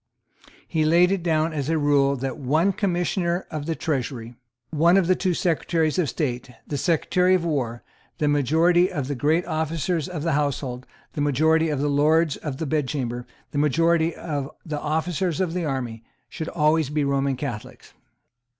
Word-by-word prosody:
He 160 -2 0
laid 170 +4 +4
it 195 -2 0
down 160 -1 +1
as 145 -1 -2
a 165 - +2
rule 140 -2 +3
that 135 0 -4
one 155 +9 +2
Commissioner 175 -1 -1
of 155 -2 -5
the 165 - -1
Treasury, 130 -7 -3 0.4
one 170 +4 +4
of 195 - +3
the 185 +2 +3
two 185 -2 0
Secretaries 165 -1 0
of 160 -6 +1
State, 125 -3 -3 0.2
the 145 - -4
Secretary 180 +3 +2
at 185 - +1
War, 130 -8 -2 0.3
the 150 - 0
majority 160 +6 +3
of 145 -7 -3
the 145 - -2
Great 155 +7 +1
Officers 160 0 -1
of 165 -5 -5
the 165 - 0
Household, 140 -3 -2 0.3
the 145 - -3
majority 160 +3 +2
of 150 -3 -1
the 145 - 0
Lords 150 +2 +3
of 145 -4 -5
the 160 - -3
Bedchamber, 130 -5 -2 0.2
the 145 - -1
majority 165 +3 +2
of 145 -3 -4 0.2
the 150 -3 -3
officers 160 +2 -1
of 180 -3 0
the 180 -2 -2
army, 125 -5 -3 0.3
should 160 -1 -5
always 155 -2 +2
be 150 0 0
Roman 140 -1 0
Catholics. 125 -5 -7
155 Hz, 175 wpm, -24 LUFS, 140-170 Hz, 0.4 s, laid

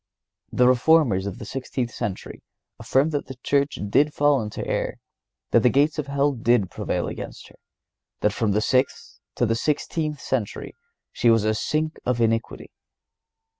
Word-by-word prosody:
The 125 - +4
Reformers 125 -6 +3
of 100 - -5
the 115 - -8
sixteenth 125 0 -4
century 95 -3 -5 0.4
affirm 140 +4 +1
that 145 -2 -3
the 130 - -8
Church 140 0 +1
did 145 +8 +2
fall 145 -3 +3
into 105 -1 -5
error; - - -2 0.6
that - - +5
the 125 - +5
gates 145 +5 +2
of 145 - -3
hell 140 +1 +1
did 120 -6 +1
prevail - - -2
against - - -8
her; - - -19 0.7
that 105 - +2
from 110 -2 0
the 105 - +1
sixth 130 +4 0 0.2
to 120 - +1
the 115 - +1
sixteenth 150 +4 -2
century 125 -4 -3 0.4
she 120 - +2
was 115 -2 +4
a 110 0 +2
sink 155 +8 -1
of 125 -1 0
iniquity. 115 0 -1
125 Hz, 165 wpm, -24 LUFS, 115-145 Hz, 0.7 s, that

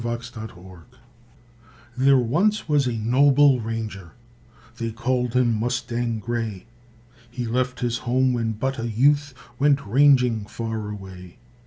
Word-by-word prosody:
MUSTANG 120 -1 -5
GRAY 90 -2 -14 1.2
There 135 +1 +4
once 175 - +1
was 145 -4 +2
a 125 - -1
noble 135 +4 +4
ranger, 110 -5 -6 0.7
They 115 -1 -2
called 125 +2 -1
him 125 -2 +3
Mustang 120 0 -2
Gray; 115 -3 -4 0.6
He 120 0 -5
left 125 +2 -2
his 120 -1 -1
home 130 +1 +1
when 115 -2 -1
but 130 +5 -3
a 115 +1 -3
youth, 145 +4 +2 0.2
Went 140 -1 +2
ranging 125 -2 +3
far 110 -1 -5
away. 95 -3 -10
120 Hz, 130 wpm, -23 LUFS, 110-130 Hz, 1.2 s, There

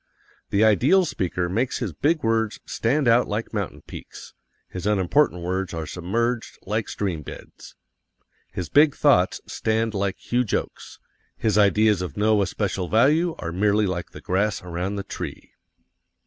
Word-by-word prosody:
The 100 +2 +2
ideal 130 - +4
speaker 90 - -2
makes 115 +8 -1
his 110 -9 -4
big 155 - 0
words 115 -1 0
stand 135 +4 0
out 120 +1 +4
like 110 +2 -4
mountain - - -4
peaks; - - -11 0.3
his 90 +2 -5
unimportant 100 0 +2
words 90 0 -2
are 80 -1 -4
submerged 115 +9 -2
like 105 +2 -2
stream 90 -6 -3
beds. - - -11 0.8
His 90 - -4
big 145 0 +4
thoughts 115 -11 +3
stand 110 0 -1
like 100 -1 -1
huge 120 -2 -1
oaks; - - -5 0.4
his 110 -3 0
ideas 105 -1 +4
of 90 -6 -6
no 105 0 +3
especial 95 -1 -2
value 155 +9 +3
are 85 - -5
merely 105 +4 +2
like 90 -2 -3
the - - -12
grass 100 +1 0
around 90 +3 -3
the 100 - -4
tree. - - -7
105 Hz, 150 wpm, -24 LUFS, 90-115 Hz, 0.8 s, ideal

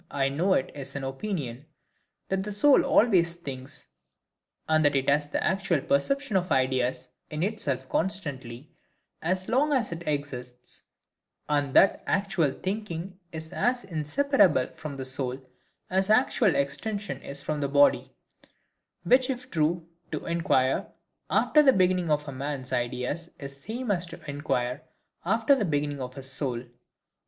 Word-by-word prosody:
I 135 -1 0
know 175 +8 +2
it 130 - -1
is 140 -1 -7
an 140 - -4
opinion, 135 - -4 0.6
that 190 0 0
the 210 +2 -5
soul 270 +8 +5
always 180 -7 +4
thinks, 135 - -9 0.8
and 155 0 +3
that 145 -1 +3
it 135 0 +1
has 145 +1 +2
the - - -1
actual 190 -4 +1
perception 255 - 0
of 180 0 -2
ideas 130 -1 +1 0.2
in 155 +2 -2
itself 140 - -2
constantly, 145 - -3 0.5
as 185 +3 0
long 280 +5 +2
as 255 -8 +1
it 170 0 -5
exists; 125 -4 -5 0.7
and 145 -3 0
that 195 - +6
actual 190 -7 +1
thinking 190 0 -5
is 160 0 -7
as 245 0 +1
inseparable 175 - +2
from 150 -3 -7
the 130 - -5
soul 130 0 -3 0.5
as 190 +2 +1
actual 220 -3 +4
extension 200 +9 -2
is 140 0 -7
from 150 -1 -2
the 140 - +1
body; 145 +1 +4 0.9
which 255 +1 +4
if 250 0 -4
true, 165 +1 0 0.2
to 155 - -4
inquire 165 -6 +1 0.4
after 300 - +4
the 270 -3 +6
beginning 180 -2 +2
of 150 0 +1
a - - -4
man's 135 -1 -4
ideas 125 +6 -2
is 140 -1 -7
the 140 +12 -8
same 250 -3 -2
as 180 -2 0
to 170 - -9
inquire 140 -2 -2 0.4
after 225 +8 +3
the 265 - +2
beginning 145 -4 -1
of 130 0 -6
his 135 -1 -6
soul. 125 -4 -2
155 Hz, 150 wpm, -27 LUFS, 135-195 Hz, 0.9 s, that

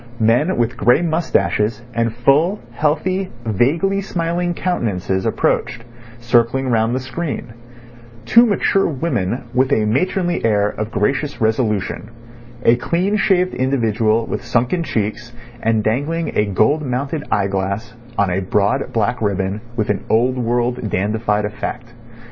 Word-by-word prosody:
Men 120 +11 +2
with 120 0 0
grey 125 - +4
moustaches 120 -9 0
and 115 -1 0
full, 150 - +3
healthy, 185 +5 0 0.2
vaguely 160 - +1
smiling 175 -1 -2
countenances 100 - -1
approached, 115 - 0 0.4
circling 120 +2 +2
round 115 0 +2
the - - 0
screen; 130 -1 -5 0.7
two 235 +1 +6
mature 200 -1 +2
women 130 - -2
with 130 +2 +2
a 110 -6 +3
matronly 175 - 0
air 105 -2 +2
of 105 +1 -4
gracious 135 +8 -1
resolution; 110 -2 -1 0.6
a 120 - +5
clean 180 +10 0
shaved 185 -3 +2
individual 115 -4 +1
with - - -4
sunken 120 +7 0
cheeks, 115 -4 -3 0.3
and 110 -1 +1
dangling 150 +9 -1
a 105 - +3
gold 110 +10 +2
mounted 140 +3 -2
eyeglass 100 +3 -1 0.2
on 100 -2 +2
a 90 - 0
broad 100 +2 0
black 115 +2 0
ribbon 100 0 -1
with 110 -3 0
an 100 - -3
old 125 +4 +2
world, 120 -1 -1
dandified 105 +2 0
effect. 120 +3 -6
120 Hz, 130 wpm, -19 LUFS, 110-150 Hz, 0.7 s, two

